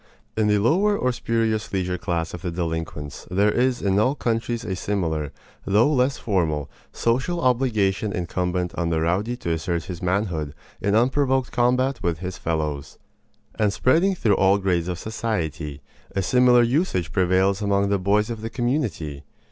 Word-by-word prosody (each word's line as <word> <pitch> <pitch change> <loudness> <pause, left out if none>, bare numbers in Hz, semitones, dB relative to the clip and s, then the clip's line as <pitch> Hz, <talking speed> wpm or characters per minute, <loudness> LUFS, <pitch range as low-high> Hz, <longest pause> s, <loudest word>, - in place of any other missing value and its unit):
In 110 -1 +2
the 105 0 +3
lower 190 - +3
or 125 - +1
spurious 115 -2 -1
leisure 90 -2 -1
class 85 -3 -2
of 90 - -6
the 90 - -3
delinquents 80 -4 -4
there 100 +3 +3
is 125 +2 +1
in 100 0 +2
all 130 +6 +2
countries 115 -2 -2
a 95 - -2
similar, 80 -7 -2 0.3
though 110 +9 +3
less 130 0 +2
formal, 80 -9 -1 0.2
social 130 +10 0
obligation 110 - +1
incumbent 90 0 -2
on 85 -1 -1
the 80 -1 +1
rowdy 95 +9 0
to 85 - -3
assert 85 +1 -1
his 90 0 -7
manhood 90 -6 -1 0.3
in 100 +1 +1
unprovoked 130 +2 +2
combat 125 +2 +1
with 85 -2 0
his 90 +1 -6
fellows. 75 -3 -3 0.6
And 105 -2 +3
spreading 170 - +2
through 105 - +2
all 95 +1 +4
grades 90 -4 0
of 90 -1 -3
society, 85 -10 -3 0.3
a 95 - +1
similar 125 +3 +5
usage 120 - 0
prevails 95 +2 +2
among 100 -1 +1
the 100 -1 +1
boys 105 +4 +1
of 115 -2 -5
the 115 - -4
community. 115 - -2
100 Hz, 165 wpm, -23 LUFS, 85-120 Hz, 0.6 s, similar